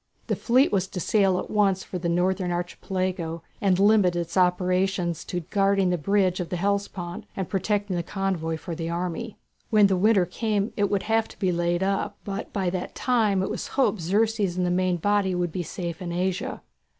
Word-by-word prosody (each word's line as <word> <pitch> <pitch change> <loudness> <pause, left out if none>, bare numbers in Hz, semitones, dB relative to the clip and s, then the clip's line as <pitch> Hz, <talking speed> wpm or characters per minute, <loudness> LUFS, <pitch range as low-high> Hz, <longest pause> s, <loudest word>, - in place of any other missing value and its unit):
The - - 0
fleet 255 +4 +3
was 195 -2 +1
to 185 - -6
sail 195 -1 +2
at - - -4
once 195 -3 +2
for 180 - -5
the 170 0 -1
northern 180 +1 +1
Archipelago, 175 -1 -3 0.2
and 190 -3 +3
limit 200 -3 +4
its 170 -1 -3
operations 180 -1 +1
to 180 - -3
guarding 195 +1 +2
the 180 - +1
bridge 190 +2 +2
of 175 - -3
the - - -2
Hellespont 195 -2 -2
and 190 -3 -2
protecting 205 0 -1
the 175 - 0
convoys 170 -3 -2
for 170 - -6
the 165 0 -4
army. 180 +6 -3 0.3
When 210 -2 +5
the 195 -1 +3
winter 200 -1 +4
came 210 +1 -1
it 205 -1 +1
would 200 -2 0
have 225 0 +1
to - - -15
be 185 -3 +1
laid 175 +1 0
up; 195 0 -1
but 200 +1 -5
by 190 -4 -1
that 185 -1 -4
time 215 -7 +2
it - - -2
was - - -4
hoped 250 -8 +2
Xerxes 205 +1 +1
and 180 - +1
the 175 - +1
main 180 0 +1
body 200 +1 +1
would 175 -1 -1
be 180 - -3
safe 170 0 -5
in 175 -1 -4
Asia. 180 +1 -2
185 Hz, 200 wpm, -25 LUFS, 175-200 Hz, 0.3 s, When